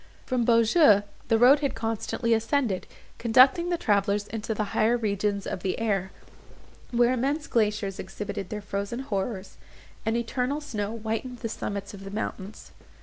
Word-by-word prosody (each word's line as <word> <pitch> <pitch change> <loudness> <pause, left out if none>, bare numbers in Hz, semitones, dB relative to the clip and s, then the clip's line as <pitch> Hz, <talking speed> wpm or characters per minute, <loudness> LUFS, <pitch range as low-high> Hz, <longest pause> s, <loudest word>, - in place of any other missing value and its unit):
From 250 -3 0
Beaujeu 230 - +5 0.2
the 225 - +3
road 255 +5 +7
had 280 -2 -1
constantly 225 +1 -1
ascended, 225 -3 0 0.3
conducting 260 +9 +5
the 350 - +1
travellers 205 -4 +1
into 220 0 -3
the 215 - 0
higher 230 +3 +3
regions 205 -2 -1
of 185 - -4
the 185 -1 -1
air, 195 -4 -1 0.8
where 240 +1 +3
immense 280 +5 -1
glaciers 210 -6 0
exhibited 195 0 -5
their 210 -1 -4
frozen 200 +5 -3
horrors, 200 -4 -4 0.5
and 225 +1 0
eternal 250 +4 -1
snow 225 -7 -4
whitened 225 +3 -4
the 230 - -3
summits 200 -2 -5
of 195 -1 -10
the 195 - -7
mountains. 200 0 -6
225 Hz, 150 wpm, -26 LUFS, 200-245 Hz, 0.8 s, road